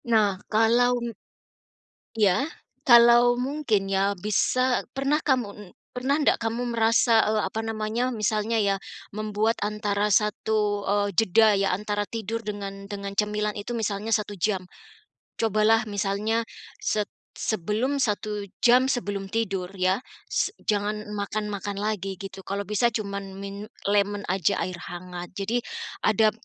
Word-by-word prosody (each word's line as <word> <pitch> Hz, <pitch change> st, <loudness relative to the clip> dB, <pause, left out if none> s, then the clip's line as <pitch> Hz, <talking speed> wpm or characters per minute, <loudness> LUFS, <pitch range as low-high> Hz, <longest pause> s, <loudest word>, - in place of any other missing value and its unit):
Nah 215 Hz, -3 st, +5 dB, 0.2 s
kalau 235 Hz, +3 st, +4 dB
m 235 Hz, -, -3 dB, 1.1 s
Iya, 205 Hz, +3 st, +4 dB, 0.4 s
kalau 240 Hz, -2 st, +7 dB
mungkin, 250 Hz, -7 st, 0 dB
ya, 195 Hz, +1 st, +2 dB
bisa 250 Hz, +6 st, +1 dB
pernah 275 Hz, +2 st, +1 dB
kamu 260 Hz, -6 st, +2 dB
n -, -, -11 dB, 0.3 s
pernah 260 Hz, +3 st, +1 dB
ndak 295 Hz, -, +3 dB
kamu 225 Hz, +2 st, -1 dB
merasa, 230 Hz, 0 st, +4 dB
eee, 215 Hz, 0 st, +2 dB
apa 220 Hz, -, -4 dB
namanya 225 Hz, +3 st, -1 dB
misalnya 215 Hz, +1 st, 0 dB
ya 200 Hz, -1 st, +2 dB, 0.4 s
membuat 215 Hz, +1 st, 0 dB
antara 210 Hz, 0 st, 0 dB
1, 210 Hz, -1 st, -1 dB
eee, 205 Hz, 0 st, +2 dB
jeda, 220 Hz, +1 st, +5 dB
ya, 195 Hz, 0 st, +1 dB
antara 205 Hz, +1 st, -2 dB
tidur 230 Hz, 0 st, -4 dB
dengan 200 Hz, -1 st, -6 dB
dengan 200 Hz, -1 st, -4 dB
cemilan 210 Hz, 0 st, 0 dB
itu 205 Hz, -, -6 dB
misalnya 215 Hz, -1 st, -2 dB
1 210 Hz, -1 st, -3 dB
jam. 190 Hz, 0 st, 0 dB, 0.8 s
Cobalah 220 Hz, +1 st, +3 dB
misalnya 210 Hz, +2 st, 0 dB, 0.4 s
set 210 Hz, -1 st, 0 dB, 0.3 s
sebelum 220 Hz, +8 st, -1 dB
1 210 Hz, -3 st, -1 dB, 0.2 s
jam 250 Hz, +2 st, +6 dB
sebelum 200 Hz, -6 st, -2 dB
tidur, 195 Hz, -5 st, -1 dB
ya, 185 Hz, +1 st, +2 dB, 0.3 s
se -, -, 0 dB
jangan 210 Hz, 0 st, -1 dB
makan-makan 205 Hz, 0 st, -3 dB
lagi 205 Hz, -2 st, -2 dB
gitu 195 Hz, -1 st, -8 dB
kalau 200 Hz, +2 st, -3 dB
bisa 210 Hz, +3 st, +2 dB
cuman 200 Hz, -2 st, -3 dB, 0.2 s
min 200 Hz, +1 st, -6 dB, 0.2 s
lemon 205 Hz, 0 st, +1 dB
aja 190 Hz, +1 st, +1 dB
air 185 Hz, -, -4 dB
hangat 180 Hz, 0 st, -7 dB
jadi, 200 Hz, +5 st, -1 dB, 0.5 s
adab 215 Hz, 0 st, +4 dB
210 Hz, 135 wpm, -26 LUFS, 200-225 Hz, 1.1 s, kalau